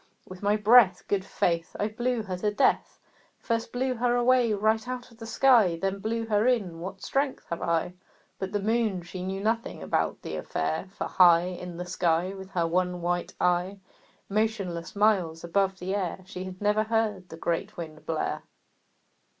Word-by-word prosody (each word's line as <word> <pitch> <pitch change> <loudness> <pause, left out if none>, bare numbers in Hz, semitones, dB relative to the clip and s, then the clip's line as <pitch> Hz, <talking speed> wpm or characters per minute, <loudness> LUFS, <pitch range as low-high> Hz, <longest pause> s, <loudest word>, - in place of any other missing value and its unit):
With 185 -1 -10
my 205 +1 +2
breath, 215 -3 +6
Good 200 -2 0
faith! 170 -2 -1
I 205 - +1
blew 240 +1 -1
her 190 -3 -4
to 210 +3 0
death 210 - +1 0.4
First 230 -1 -2
blew 255 +1 0
her 245 0 +1
away 245 -1 +3
right 220 +3 +1
out 250 -1 -5
of 230 - -19
the 225 - -7
sky 225 -7 +4
Then 195 +1 -1
blew 225 +2 -2
her 215 +1 +2
in; 200 -10 0
what 190 +2 -7
strength 275 0 -1
have 170 - -3
I!" 170 +1 0 0.5
But 190 0 -3
the 205 - 0
Moon, 215 -3 0
she 180 +1 -7
knew 190 +1 -3
nothing 225 +2 -1
about - - -1
the - - -4
affair, 160 - -2
For 195 - -5
high 175 -2 +6
In 180 -1 -6
the 180 - -4
sky, 180 0 0
With 190 -1 -9
her 175 -3 0
one 180 +1 0
white 175 0 -1
eye, 180 +2 +1 0.5
Motionless, 195 -6 -2
miles 190 -6 +2
above 190 +2 +1
the 185 +1 -3
air, 190 -2 -2
She 185 -1 -7
had 185 0 -8
never 210 +1 +2
heard 215 -5 -1
the 160 - -9
great 175 +6 -2
Wind 155 -2 -7
blare. 160 -1 -2
195 Hz, 180 wpm, -27 LUFS, 180-220 Hz, 0.5 s, breath